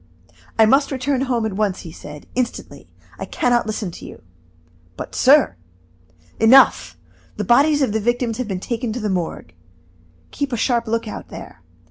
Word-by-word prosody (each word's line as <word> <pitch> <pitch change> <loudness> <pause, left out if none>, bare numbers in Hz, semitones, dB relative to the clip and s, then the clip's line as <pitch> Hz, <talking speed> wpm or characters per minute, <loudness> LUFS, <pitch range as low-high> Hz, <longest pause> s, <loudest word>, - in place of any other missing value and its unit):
"I 220 - +6
must 275 +6 +3
return 265 0 -1
home 245 -4 0
at 220 - -2
once," 200 -1 -1
he 165 - -10
said, 150 -2 -11
"instantly; 250 -1 -4 0.3
I - - -4
can 245 - -1
not 240 -2 +2
listen 210 -4 -3
to - - -11
you." - - -13 0.7
"But, - - -7
sir 275 - +4 0.4
" 85 -1 -32
"Enough! 270 +2 +5 0.4
the - - -2
bodies 290 +4 +4
of 255 - 0
the 220 - 0
victims 240 +1 -1
have 255 - -2
been 190 -3 -3
taken 235 +3 -3
to 250 - -4
the 210 -3 -2
Morgue. 170 - -4 0.8
Keep 280 -2 -3
a - - 0
sharp 235 0 0
lookout 225 -1 -3
there. 85 - -11
230 Hz, 175 wpm, -20 LUFS, 200-255 Hz, 0.8 s, I